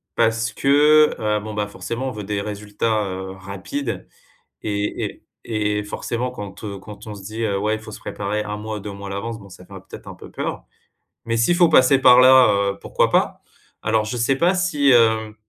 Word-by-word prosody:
parce 115 +1 +1
que, 150 +2 +4
heu, 105 -1 0
bon, 105 +1 -7
bah, 105 0 -1
forcément 120 +5 -4
on - - -5
veut 105 -2 -7
des 100 0 -2
résultats, 105 +1 -2
heu, 95 0 -5
rapides 100 +7 -6 0.6
et 105 -1 -2
et - - -8 0.2
et 105 -2 -1
forcément 120 +4 -3
quand, 105 -3 -8
heu, 100 -2 -6
quand 105 +2 -12
on 105 - -6
se 100 - -11
dit: 110 +2 -3
«Ouais, 105 +2 0
il - - -7
faut 110 - -10
se - - -9
préparer 105 +1 -3
1 105 0 -5
mois, 110 0 -5
2 105 - -6
mois 100 0 -8
à - - -6
l'avance», 115 +3 -5
bon 100 - -13
ça 90 -1 -14
fait 100 - -15 0.2
peut-être - - -11
un - - -7
peu - - -13
peur. - - -5 0.6
Mais 115 0 -1
s'il 115 +10 +3
faut 175 -1 +5
passer 135 -3 +5
par 125 -1 +7
là, 125 -7 +6
heu, 100 - -11
pourquoi - - 0
pas. - - +1 0.4
Alors 110 0 +1
je 120 - -4
sais 120 +3 +1
pas 175 +4 +3
si, 150 -7 +2
hem, 110 -3 +3
110 Hz, 215 wpm, -21 LUFS, 105-125 Hz, 0.6 s, par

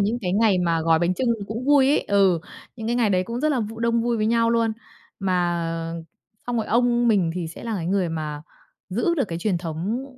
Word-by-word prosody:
những 215 +4 +1
cái 180 -4 -2
ngày 205 -2 +3
mà 170 -2 +1
gói 165 0 +3
bánh 175 +2 +1
chưng 255 - -1 0.2
cũng 225 +4 -5
vui 280 -2 +5
ấy. 290 - +3
Ừ, 195 -4 +3 0.4
những 220 -2 -6
cái 240 +1 0
ngày 225 -4 +2
đấy 185 -1 +2
cũng 235 +5 -4
rất 305 - +2
là 265 -5 +1
v 225 +1 -5
đông 230 0 +1
vui 235 0 0
với 215 -1 0
nhau 230 0 +2
luôn. 230 -1 +2 0.5
Mà 180 -3 0 0.9
xong 245 - -1
rồi 220 -2 -1
ông 240 0 +2
mình 190 -7 +3
thì 180 -2 -3
sẽ 165 - -10
là 230 -1 -2
cái 165 - -4
người 185 -1 +1
mà 155 -2 -4 0.5
giữ 235 - 0
được 285 - +1
cái 165 - -4
truyền 180 -1 0
thống, 180 +9 -3
215 Hz, 235 wpm, -23 LUFS, 180-235 Hz, 0.9 s, vui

